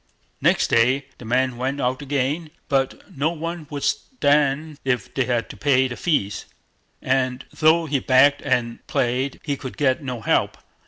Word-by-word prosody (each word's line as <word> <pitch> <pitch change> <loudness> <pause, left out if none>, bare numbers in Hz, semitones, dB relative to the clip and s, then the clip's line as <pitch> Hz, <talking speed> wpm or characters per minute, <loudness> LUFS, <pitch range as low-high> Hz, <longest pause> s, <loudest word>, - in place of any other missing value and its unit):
Next - - +3
day 130 +4 +3
the 120 - -10
man 125 +1 +1
went 135 +3 -2
out 130 +1 -1
again, 145 +3 -1 0.2
but 135 -1 -1
no 145 +3 +1
one 165 -1 -5
would 145 -3 -5
stand 150 - +1
if 125 -5 -1
they 135 - +1
had 120 -2 0
to - - -11
pay 130 -3 +3
the 120 - -6
fees; 105 - -1 0.6
and 130 0 0
though 165 +1 +4
he 145 -3 0
begged 130 +3 +4
and 125 -4 -1
prayed, 130 +2 -1
he 145 -2 -1
could 130 -2 -8
get 130 -3 +2
no 125 -4 -4
help. - - +1
135 Hz, 165 wpm, -22 LUFS, 125-145 Hz, 0.6 s, though